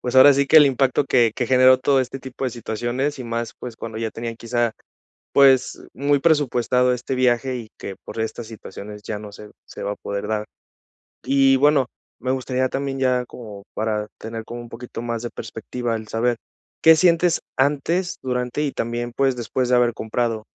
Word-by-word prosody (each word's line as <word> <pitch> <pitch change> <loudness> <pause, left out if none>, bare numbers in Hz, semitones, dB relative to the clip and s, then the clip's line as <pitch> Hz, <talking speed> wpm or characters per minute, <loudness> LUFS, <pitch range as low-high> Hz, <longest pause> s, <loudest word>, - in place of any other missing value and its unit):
pues 125 +1 -2
ahora 135 +2 +9
sí 140 +1 +2
que 155 +3 +8
el 150 - +7
impacto 135 0 +2
que 120 -5 +3
que 125 - -1
generó 130 +1 +6
todo 135 +1 +3
este 130 +1 -4
tipo 130 +1 -6
de 130 - 0
situaciones 120 +5 -3
y 125 - -6
más, 115 0 -3
pues, 120 -2 -7
cuando 110 -1 -6
ya 115 -1 -2
tenían 115 0 -6
quizá 120 -1 -1 0.6
pues 135 -2 +4
muy 140 +1 +2
presupuestado 125 -5 +2
este 125 +2 -3
viaje, 125 0 +1
y 115 -3 -8
que 95 - -7
por - - -6
estas 110 +1 -4
situaciones 105 -1 -9
ya 105 0 -4
no 105 -1 -10
se 105 +1 -11 0.2
se - - -9
va 100 - -1
a - - -7
poder 100 +1 -5
dar, 105 -1 -1 0.8
y 135 -1 +4
bueno, 140 -1 +4 0.3
me 130 +2 -2
gustaría 130 0 -1
también 135 0 -3
ya 125 -1 +1
como 105 -5 -10
para 105 -1 -1
tener 115 0 -6
como 120 +2 -7
un 120 - -11
poquito 120 0 -8
más 115 -1 -3
de 120 - -4
perspectiva, 115 +2 -4
el 110 -1 -8
saber 120 +2 0 0.5
qué 160 0 +8
sientes 170 0 +3 0.2
antes, 150 +6 0
durante 125 +2 -2
y 145 - -1
también, 120 +1 -3
pues 135 -2 +2
después 120 +2 -2
de 125 - +5
haber 120 -1 +3
comprado. 110 0 -2
125 Hz, 195 wpm, -22 LUFS, 115-135 Hz, 0.8 s, ahora